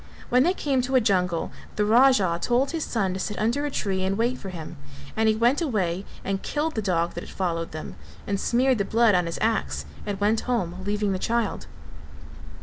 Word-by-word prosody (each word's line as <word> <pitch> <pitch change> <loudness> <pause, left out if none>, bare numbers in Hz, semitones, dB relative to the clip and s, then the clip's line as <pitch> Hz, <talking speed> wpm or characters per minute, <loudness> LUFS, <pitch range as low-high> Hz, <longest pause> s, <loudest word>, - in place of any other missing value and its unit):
When 250 +1 +4
they 355 +7 +3
came 275 -6 +1
to 260 +2 -1
a - - +7
jungle 180 -7 +1 0.2
the 210 - +1
Raja 215 -7 +4
told 255 +3 +1
his 325 -2 -2
son 195 -6 -1
to 190 - -4
sit 210 +2 -3
under 240 +7 0
a - - -2
tree 195 -8 -1
and 195 +1 0
wait 240 +3 0
for 195 - -7
him, 165 -2 -7 0.4
and 220 0 +3
he 215 - +3
went 240 +8 +2
away 195 - -1 0.2
and 195 0 -1
killed 310 +2 -1
the 220 - -1
dog 175 -4 0
that - - -5
had - - -10
followed 165 -3 -2
them 155 - -7 0.3
and 200 -1 -1
smeared 250 +2 +2
the - - +2
blood 225 +1 +4
on 180 -2 +2
his 165 - -4
axe 70 0 0 0.2
and 200 -2 -4
went 210 +2 +2
home, 185 -8 0
leaving 205 0 0
the 190 - -1
child. 230 -1 -1
210 Hz, 215 wpm, -25 LUFS, 185-245 Hz, 0.4 s, a